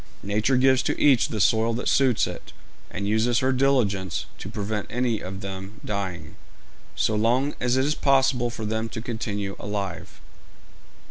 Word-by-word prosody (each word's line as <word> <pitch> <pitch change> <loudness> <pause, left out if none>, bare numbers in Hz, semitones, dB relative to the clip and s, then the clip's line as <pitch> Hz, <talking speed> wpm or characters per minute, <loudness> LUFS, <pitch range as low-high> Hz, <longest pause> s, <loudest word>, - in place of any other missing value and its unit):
Nature 110 +6 +1
gives 130 0 +4
to - - -2
each 135 -5 +5
the 110 - -4
soil 110 +3 +3
that 120 - -3
suits 130 -4 +3
it, - - -8 0.4
and 100 +1 -4
uses 110 +3 +2
her 130 +2 +2
diligence 125 -8 +1
to 95 - -7
prevent 105 -1 -3
any 120 -3 -1
of 95 +1 -7
them 95 +1 -7
dying, 95 -3 -4 0.6
so 110 - +1
long 120 +7 +2
as 125 +1 +1
it 130 - +2
is 150 - +2
possible 135 -4 +2
for 115 -2 -6
them 110 +1 -2
to - - -5
continue 105 -4 -4
alive. 100 -2 -5
110 Hz, 160 wpm, -25 LUFS, 100-125 Hz, 0.6 s, each